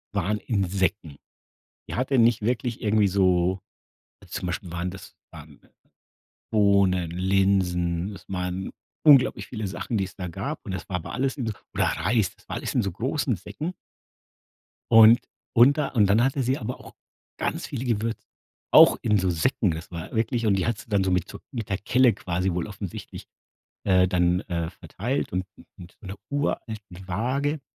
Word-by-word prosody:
waren 105 +2 0
Insekten. 95 - -1 0.7
Die - - -5
hatte 130 +2 0
nicht 115 -1 +4
wirklich 120 +1 -1
irgendwie 105 -1 +3
so 95 -1 +2 0.7
zum - - -5
Beispiel 90 0 -4
waren 85 +1 -2
das, 95 - -11 0.2
ähm, - - -13 0.9
Bohnen, 100 -5 +3
Linsen, 95 -1 +1
es - - -14
waren 90 0 -3 0.3
unglaublich 140 -4 +5
viele 110 -4 -4
Sachen, 95 +5 -3
die 95 - 0
es 90 - -12
da 90 -2 -5
gab 85 - -5
und - - -5
das 95 - -5
war 95 - -3
aber 80 - -8
alles 135 +1 -1
in 125 -5 -4
so 110 - -1 0.2
oder - - +1
Reis, 95 +3 0
das - - -26
war - - -5
alles - - -4
in 125 - +2
so 100 -3 -2
großen 130 - -1
Säcken. 155 - -6 1.2
Und 115 +1 +8 0.4
und 130 +5 +6
da 150 -2 0
und 105 -5 +3
dann 105 +4 +4
hatte 135 +1 +1
sie 130 +3 +1
aber 125 0 -5
auch - - -13 0.5
ganz - - -2
viele 125 - -5
Gewür 115 -1 0 0.6
auch - - +8
in 105 -1 +2
so 95 -1 +1
Säcken. 90 +4 +1
Das 80 +1 -7
war 85 -2 -7
wirklich 115 +1 0
und 105 -2 +3
die 95 - 0
hat 115 -2 0
sie - - -13
dann 100 -2 +2
so 95 - 0
mit 90 +1 +1
so 100 - -9
mit 115 -6 -5
der 100 - 0
Kelle 125 +3 +3
quasi 90 +1 -2
wohl 90 +2 -2
offensichtlich, 100 -3 -8 0.6
äh, 95 -2 +4
dann, 90 0 +2
äh, 85 -3 -3
verteilt 120 +8 -4
und 90 +1 -1
u - - -13 0.2
und 90 0 -13
mit - - -58
'ner 95 0 -7
uralten 140 -6 -2 0.3
Waage 135 - -1
100 Hz, 180 wpm, -25 LUFS, 90-115 Hz, 1.2 s, Und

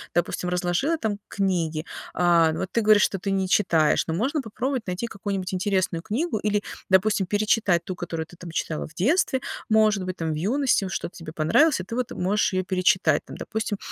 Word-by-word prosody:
допустим, 175 +1 0
разложила 180 - 0
там 215 -7 -2
книги. 170 -5 -1 0.3
А, 170 -2 +4
вот 185 +3 -3
ты - - +1
говоришь, 210 -1 +5
что 195 - 0
ты 195 +2 -2
не 190 -1 0
читаешь, 165 -6 +3
но 160 - -1
можно 265 - 0
попробовать 255 +1 -3
найти 185 +6 -3
какую-нибудь 195 -3 -4
интересную 185 -3 0
книгу 225 - -2
или, 210 0 0 0.3
допустим, 190 0 +3
перечитать 205 -3 +2
ту, 185 - -5
которую 165 -2 -4
ты 175 - -16
там 175 - -9
читала 160 -1 -3
в 155 - -17
детстве, 260 - +2 0.3
может 215 -3 +3
быть, 185 0 -4
там, 165 -3 -2
в - - -2
юности, 220 - +1
что-то 185 -1 -4
тебе 165 -2 -8
понравилось, 185 - +3
и - - -6
ты 230 - -6
вот 250 -1 -2
можешь 195 +3 0
её 185 0 +1
перечитать, 185 -4 +2
там, - - -10
допустим, 220 -1 -3
190 Hz, 195 wpm, -25 LUFS, 175-215 Hz, 0.3 s, говоришь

